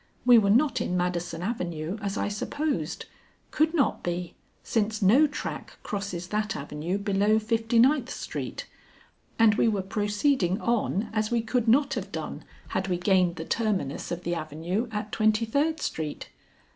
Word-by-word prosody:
We 245 -2 +8
were 200 -2 +2
not 270 +8 +3
in 180 - -1
Madison 175 -1 -2
Avenue, 180 -3 -3
as 200 0 -3
I - - 0
supposed; 285 +9 -2 0.5
could 315 +2 +2
not 285 - +1
be, 175 0 -3 0.3
since 215 -1 0
no 235 +10 +5
track 290 - -6
crosses 195 -4 -4
that 210 -1 -1
avenue 150 +6 -3
below 205 +1 +2
Fifty 225 +1 0
ninth 260 +1 +4
Street, - - -5 0.7
and 225 -2 +6
we 220 - +2
were 205 -4 +1
proceeding 205 0 +1
on 220 -2 0
as 215 -1 0
we 235 -1 +1
could 235 +1 0
not 275 +4 +4
have 200 -5 -4
done 155 -1 -5 0.3
had 190 +1 -1
we 180 -2 0
gained 180 -1 +2
the 160 -1 -6
terminus 200 - -1
of 175 +1 -4
the 175 - -1
avenue 165 - -2
at 210 0 -4
Twenty 215 +1 +2
third 300 +7 0
Street. 155 - -4
210 Hz, 160 wpm, -27 LUFS, 180-230 Hz, 0.7 s, We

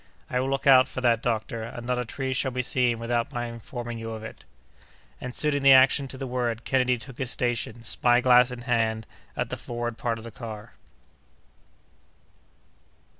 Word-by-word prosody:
"I 125 - +1
will 130 +1 -1
look 135 0 -2
out 130 -2 +7
for - - -6
that, 120 -2 +3
doctor, 115 -1 -2
and 115 +1 -7
not 125 0 0
a 125 - -2
tree 130 +3 -3
shall 130 +1 0
be 125 0 -2
seen 125 -1 +2
without 115 +3 -1
my 120 -3 -3
informing 120 0 -6
you 115 0 -6
of 110 -1 -6
it." 110 - -10 0.8
And, 125 0 -6
suiting 150 -2 +1
the 135 0 +8
action 130 +1 +5
to 130 - -9
the 135 - -4
word, 120 -2 -2
Kennedy 125 -1 +2
took 125 +2 -11
his 130 -3 -1
station, 120 -2 -2
spy 120 +2 +3
glass 125 0 +5
in 125 -1 -7
hand, 115 -3 0 0.3
at - - -2
the - - -3
forward 120 -1 -5
part 115 -1 -1
of 110 - -10
the 115 - -8
car. 110 -3 -9
120 Hz, 190 wpm, -26 LUFS, 115-130 Hz, 0.8 s, the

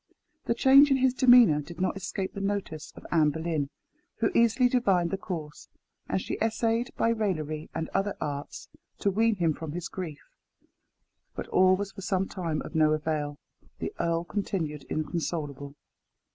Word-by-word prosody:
The 235 - +1
change 275 +4 +7
in 270 - +4
his 260 -1 +3
demeanour 245 - +6
did 170 +4 -11
not 185 - 0
escape 195 0 -4
the 200 - -5
notice 195 -6 -3
of - - -13
Anne 155 -3 +4
Boleyn, 160 -2 -2 0.5
who 225 - 0
easily 235 +2 +4
divined 195 -9 +2
the - - +1
cause, 155 -6 -7 0.4
and - - +1
she - - -4
essayed 225 +1 +1
by 230 - +2
raillery 160 -9 -2
and 160 0 -2
other 195 +1 -1
arts 145 -1 -5 0.3
to 200 - +1
wean 225 +3 +2
him 170 -4 +1
from 155 -1 -7
his 175 +1 -5
grief. 160 -6 -7 1.1
But - - -5
all 185 0 +5
was 200 +1 -4
for 195 - -10
some 190 0 0
time 165 -5 -3
of - - -9
no 155 -1 +4
avail. 150 -1 -2 0.4
The - - -4
earl 170 0 0
continued 170 -6 -3
inconsolable. 150 -3 -4
180 Hz, 165 wpm, -28 LUFS, 155-210 Hz, 1.1 s, change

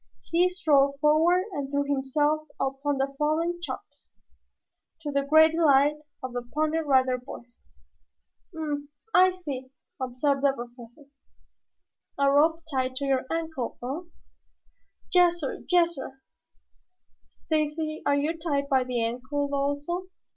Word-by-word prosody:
He 350 +2 +2
strode 280 -6 +3
forward 320 +5 +4
and 285 -6 -4
threw 285 0 0
himself 290 +2 0
upon 275 +1 -1
the 270 +1 -1
fallen 330 +3 0
Chops, - - -8 0.9
to 295 -2 -4
the 280 0 +1
great 315 +3 +6
delight 295 -2 +4 0.3
of 255 -1 -5
the 245 - -2
Pony 305 +6 -1
Rider 260 -4 +2
Boys. 245 -1 -12 0.9
"Hm 320 -2 -6
m 300 - -3
m! 290 0 -4 0.2
I 370 +1 +7
see," 280 -8 -6 0.3
observed 265 +2 0
the 280 -1 +3
Professor. 240 +2 -11 1.1
"A 280 0 +3
rope 320 +3 +3
tied 260 -1 -1
to 280 +1 -3
your 265 -1 0
ankle, 320 -7 -3
eh?" 310 +8 -5 1.0
"Yassir, 345 -5 +2
yassir." 335 -7 +1 1.1
"Stacy, 310 0 -2
are 285 - +2
you 300 +4 0
tied 285 -4 -1
by 265 -2 +3
the 250 -1 -2
ankle 255 +5 -2
also?" 285 +6 -2
285 Hz, 130 wpm, -27 LUFS, 270-320 Hz, 1.1 s, I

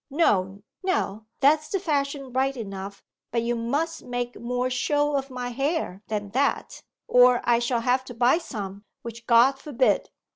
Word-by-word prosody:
'No, 200 - +1 0.2
no; 220 - -1
that's 305 +2 +4
the 390 - -1
fashion 280 -6 -2
right 265 +1 0
enough, 200 -2 -7 0.3
but 230 -1 -1
you 240 +1 0
must 285 +8 -2
make 245 0 -4
more 245 +1 -1
show 290 +3 +1
of 275 0 -2
my 250 -1 -4
hair 275 - -2
than 205 -2 -3
that, 270 +5 -1 0.3
or 250 0 +6
I 235 -1 +3
shall 235 0 0
have 255 +2 +1
to 245 - -9
buy 245 +7 +3
some, 205 - -7 0.2
which 235 0 -9
God 250 +3 +5
forbid! 265 -3 +1
250 Hz, 160 wpm, -25 LUFS, 230-280 Hz, 0.3 s, or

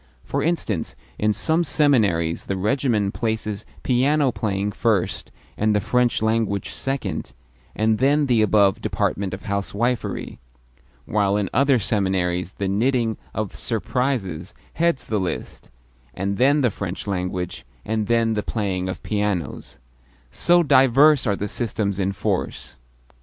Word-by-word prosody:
For - - -2
instance, 135 - -1 0.2
in 105 0 +2
some 160 +10 +2
seminaries 105 - +2
the 95 - -1
regimen 105 -1 +1
places 110 -2 -3 0.2
piano 135 +2 +2
playing 100 -3 -2
first, 105 -4 0 0.3
and 110 0 +1
the - - +3
French 120 +2 +1
language 110 -3 0
second, 135 - -3 0.4
and 110 0 +1
then 145 +3 +3
the 120 -5 +3
above 100 -2 +3
department 100 -1 -1
of 95 - -7
housewifery; 100 +4 -2 0.7
while 100 -1 +1
in 100 -2 -2
other 140 -1 +4
seminaries 95 -4 0
the 100 - -3
knitting 115 +3 +1 0.2
of 110 -3 -3
"surprises" 110 - -2 0.2
heads 165 -7 +1
the 110 - -1
list, 90 -2 -5 0.5
and 100 +1 -2
then 140 +3 +4
the 125 -4 +2
French 95 -1 -5
language, 90 -2 -3 0.2
and 110 -1 -1
then 115 -1 +2
the 105 - 0
playing 95 -4 -2
of 95 - -6
pianos 100 -12 -2 0.5
so 175 0 +4
diverse 135 0 +5
are 100 - +2
the 105 - -3
systems 100 -3 -2
in 95 0 +1
force! 95 - -3
105 Hz, 135 wpm, -22 LUFS, 100-125 Hz, 0.7 s, diverse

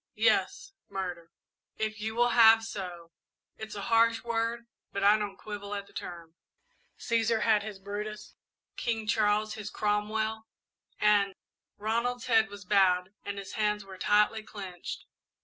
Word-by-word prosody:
"Yes, - - +1 0.2
murder, 180 -3 -5 0.5
if 215 0 -3
you 220 +1 -3
will 240 +1 +4
have 225 -1 +7
so. 175 -6 -7 0.5
It's 220 -1 -7
a 200 - -4
harsh 230 0 +3
word, 235 0 -1 0.3
but 200 - -3
I 205 +1 +7
don't 205 -2 -3
quibble 205 -1 -6
at 200 0 -5
the - - -21
term. 170 -2 -7 0.6
'Cæsar 230 -1 +1
had 215 -2 +4
his 210 -1 -7
Brutus, 205 +2 -6 0.4
King 225 -2 -2
Charles 215 0 +2
his 210 -1 -6
Cromwell, 215 +2 -1 0.5
and 205 -2 +3 0.2
'" - - -61
Ronald's 235 +3 -1
head 225 -4 +4
was 205 -1 -10
bowed 185 -1 +3
and 200 0 -5
his 195 -1 -7
hands 210 -1 0
were 190 -1 -11
tightly 210 +1 +3
clenched. 190 -5 -7
210 Hz, 150 wpm, -29 LUFS, 200-225 Hz, 0.6 s, have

